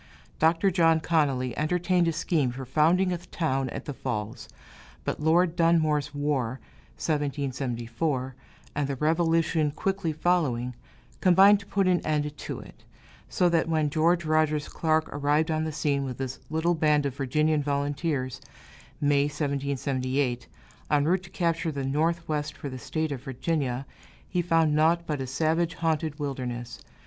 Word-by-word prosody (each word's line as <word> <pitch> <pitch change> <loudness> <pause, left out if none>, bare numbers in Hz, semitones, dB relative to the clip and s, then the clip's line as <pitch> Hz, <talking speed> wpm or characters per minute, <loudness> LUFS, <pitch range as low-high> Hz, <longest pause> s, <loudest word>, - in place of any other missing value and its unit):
Dr. 165 +5 +3
John 165 -2 +4
Connolly 140 -7 +1
entertained 175 +3 +1
a - - +2
scheme 155 -4 0
for 130 +2 -6
founding 170 +7 +3
a 175 - -3
town 135 -7 -2
at - - -6
the 145 - -4
Falls, 110 -5 -5 0.5
but - - -3
Lord 165 +2 +3
Dunmore's 155 -4 +2
War 140 -4 -1 0.4
(1774), 135 -2 -2 0.4
and 145 -1 -1
the 140 - -2
Revolution 160 +1 +2
quickly 185 +3 -2
following, 150 -7 0 0.5
combined 195 +3 +6
to 200 - -14
put 195 -2 +1
an 180 -1 +2
end 150 -1 -1
to - - -6
it; - - -14 0.5
so 180 - +2
that 165 -1 +1
when 155 -2 +1
George 170 +2 +2
Rogers 155 -1 +1
Clark 160 -1 +1
arrived 145 +3 +1
on 155 0 0
the 160 - -2
scene 145 -2 0
with 130 -3 -5
his 135 -1 -4
little 160 +3 +1
band 150 -3 +2
of 135 -2 -2
Virginian 150 +3 +1
volunteers 140 -1 -2 0.6
(May, 145 -1 +3
1778), 140 -3 -1 0.4
en 145 0 +3
route 180 +3 +2
to 180 - -13
capture 170 -2 -1
the 140 -2 -3
Northwest 155 +1 -1
for 140 - -6
the 130 -1 -7
State 155 +5 -2
of 135 -3 -4
Virginia, 135 -1 -2 0.4
he 180 - 0
found 165 -3 +2
naught 165 +3 +3
but 150 -4 -2
a 130 - -3
savage 160 +5 0
haunted 160 -2 -1
wilderness. 125 -5 -4
150 Hz, 150 wpm, -27 LUFS, 140-165 Hz, 0.6 s, combined